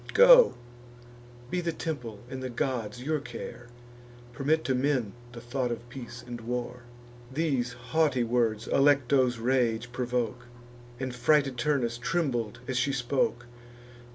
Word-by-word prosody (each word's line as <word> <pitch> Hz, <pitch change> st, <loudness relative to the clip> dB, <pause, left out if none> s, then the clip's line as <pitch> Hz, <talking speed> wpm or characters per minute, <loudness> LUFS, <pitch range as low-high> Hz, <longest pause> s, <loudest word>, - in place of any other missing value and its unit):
Go; -, -, +8 dB, 1.0 s
be 180 Hz, -, 0 dB
the 170 Hz, -1 st, -1 dB
temple 125 Hz, -11 st, -5 dB
and 130 Hz, 0 st, -6 dB
the 130 Hz, -, -4 dB
gods 125 Hz, -3 st, -3 dB
your 155 Hz, +2 st, 0 dB
care; 120 Hz, -2 st, -8 dB, 0.7 s
Permit 150 Hz, +6 st, +1 dB
to 135 Hz, -, 0 dB
men 130 Hz, -5 st, 0 dB, 0.2 s
the 120 Hz, -, -9 dB
thought 120 Hz, +1 st, -2 dB
of 120 Hz, 0 st, -5 dB
peace 120 Hz, -2 st, -9 dB
and 120 Hz, -1 st, -7 dB
war." 125 Hz, +1 st, -4 dB, 0.5 s
These 130 Hz, -5 st, 0 dB
haughty 125 Hz, +2 st, +1 dB
words 115 Hz, -2 st, 0 dB
Alecto's 135 Hz, -3 st, +3 dB
rage 120 Hz, -1 st, 0 dB
provoke, 125 Hz, -1 st, -2 dB, 0.5 s
And 130 Hz, -1 st, -3 dB
frighted 135 Hz, +2 st, +2 dB
Turnus 120 Hz, -4 st, 0 dB
trembled 120 Hz, -7 st, -1 dB
as 130 Hz, -, -1 dB
she 140 Hz, -, +1 dB
spoke. 120 Hz, -1 st, 0 dB
125 Hz, 130 wpm, -28 LUFS, 120-140 Hz, 1.0 s, Go